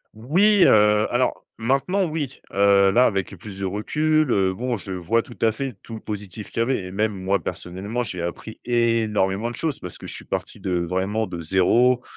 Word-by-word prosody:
Oui, 185 - +4
heu, 105 0 +5
alors 125 +1 0
maintenant 135 - +1
oui, 155 -5 -4
heu, 100 0 +5
là 125 +5 +5
avec 100 -4 0
le 100 - -10
plus 95 +2 -10
de 95 - -3
recul, 155 +9 +1
heu, 95 -3 +2
bon 120 +3 -2
je 95 - -8
vois 95 +6 0
tout 120 - -13
à 110 - +4
fait 130 +3 -4
tout 115 - -9
le - - -7
positif 105 -1 -7
qu’il - - -4
y - - +4
avait, 120 -3 0
et 90 - -7
même 105 +2 0
moi 100 +1 +1
personnellement 100 +7 -4
j’ai 90 -5 -5
appris 85 +6 -6
énormément 115 -3 +1
de 120 - -7
choses 155 -4 -2
parce 90 - -7
que - - -11
je - - -6
suis - - -9
parti - - -4
de 90 -2 -1
vraiment 95 +5 -1
de 90 -4 -6
0, 115 +9 +3
110 Hz, 210 wpm, -23 LUFS, 95-125 Hz, -, heu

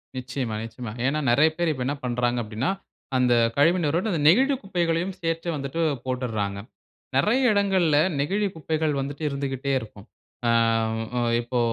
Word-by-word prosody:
நிச்சயம, 125 -3 -3
நிச்சயமா. 115 -1 -7
ஏனா 150 +3 +1
நிறைய 155 +6 +5
பேரு 170 -2 +1
இப்ப 130 -2 -4
என்ன 145 - -1
பண்றாங்க 120 0 0
அப்பிடினா, 110 - -2 0.5
அந்த 125 -1 +3 0.2
கழிவு 165 +6 +5
நீரோட, 165 +7 0
அந்த 160 -4 -1
நெகிழி 265 - +5
குப்பைகளையும் 175 0 -1
சேர்த்து 165 +1 -2
வந்துட்டு 140 +4 -3 0.2
போட்டுர்றாங்க. 110 -6 -2 0.6
நெறைய 240 - +3
இடங்கள்ல 190 -7 +2 0.2
நெகிழி 200 +8 0
குப்பைகள் 155 -1 -1
வந்துட்டு 140 +3 -5
இருந்துகிட்டே 140 -1 -3
இருக்கும். 105 -1 -12 0.4
ஆ, - - +4 0.7
அ, - - +1 0.2
இப்போ 120 +1 -2
145 Hz, 145 wpm, -25 LUFS, 125-170 Hz, 0.7 s, நிறைய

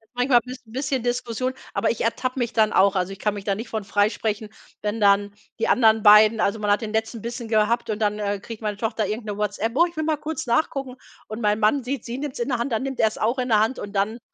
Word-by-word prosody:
manchmal 245 -1 +4
ist 250 -2 -10
'n - - -16
bisschen 265 -1 -1
Diskussion, 245 +1 -2 0.2
aber - - +1
ich 230 - -2
ertappe 255 +3 -1
mich 240 -1 -1
dann 215 -2 +3
auch. 195 +1 +4
Also, 185 0 -1
ich 195 - -8
kann 210 - 0
mich 200 -1 -8
da 200 -2 +1
nicht 225 +3 -7
von 220 -2 -3
freisprechen, 210 +1 -1 0.3
wenn 210 +2 -2
dann 200 0 +3 0.3
die - - +1
anderen 220 -3 +4
beiden 215 +1 +7
also, 215 +1 +1
man 210 - -2
hat 205 - +2
den 220 -1 -5
letzten 220 0 -2
Bissen 235 0 -5
gehabt 225 +2 +1
und 215 - -1
dann, 210 0 0
äh, 205 -1 -2
kriegt 225 +2 -9
meine 210 -2 -3
Tochter 220 -2 -1
irgend 215 +2 -4
'ne 205 -1 -4
Whatsapp. 210 +2 -1
Oh, 340 - +5
ich 340 - -20
will 315 - 0
mal 310 -1 0
kurz 310 -2 -5
nachgucken. 260 +1 -1 0.3
Und 215 +2 -6
mein 210 0 +1
Mann 225 +6 +2
sieht: 255 0 -4
Sie 240 +2 -5
nimmt's 290 -2 -5
in 240 +3 -2
der 245 -2 0
Hand, 240 +2 -2
dann 225 +2 0
nimmt 270 -1 -4
er's 220 -1 +2
auch 235 +4 0
in 250 - -1
der 215 -2 +4
Hand 225 +4 0
und 205 0 -7
dann 205 +4 -1
225 Hz, 270 wpm, -23 LUFS, 210-245 Hz, 0.3 s, beiden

